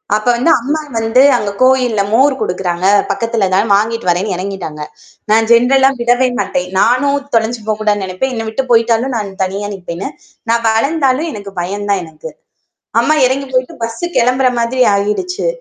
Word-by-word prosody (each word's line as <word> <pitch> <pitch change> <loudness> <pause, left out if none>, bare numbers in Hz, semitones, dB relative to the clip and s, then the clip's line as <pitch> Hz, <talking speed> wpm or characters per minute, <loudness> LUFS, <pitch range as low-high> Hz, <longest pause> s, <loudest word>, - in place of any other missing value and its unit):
அப்ப 215 - -3
வந்து 270 +8 +2
அம்மா 295 +5 -2 0.2
வந்து 225 +3 +2 0.2
அங்க 205 -2 -3
கோவில்ல 255 -5 +3
மோர் 270 +4 +4
குடுக்கிறாங்க. 180 0 -2 0.3
பக்கத்தில 230 -4 -1
தான் 205 +3 +1
வாங்கிட்டு 225 -1 -1
வர்றேன்னு 185 +3 0
இறங்கிட்டாங்க. 185 -5 -6 0.5
நான் 225 +1 +3
ஜெனரல்லா 265 +3 +5
விடவே 245 +2 +2
மாட்டேன். 180 0 -2
நானும் 280 +4 +2 0.2
தொலைஞ்சி 230 0 0
போக்கூடாதுனு 210 -2 0
நினைப்பேன். 185 +9 -3
என்ன 225 -1 -4
விட்டு 260 +4 -3
போயிட்டாலும் 230 +2 +2
நான் 205 -2 -4
தனியா 195 +2 -3
நிப்பேண்ணு. 180 -1 -6 0.4
நான் 230 0 +1
வளந்தாலும் 275 +5 +1
எனக்கு 200 -5 -9
பயம் 200 +4 -4
தான் 195 - +1
எனக்கு. 160 -1 -10 0.7
அம்மா 310 - +2
இறங்கி 275 +2 -1
போயிட்டு 255 0 -1
பஸ் 230 0 -6 0.2
கிளம்புற 255 +2 +3
மாதிரி 250 +2 0
ஆயிடுச்சு. 210 - -2
225 Hz, 155 wpm, -14 LUFS, 200-255 Hz, 0.7 s, ஜெனரல்லா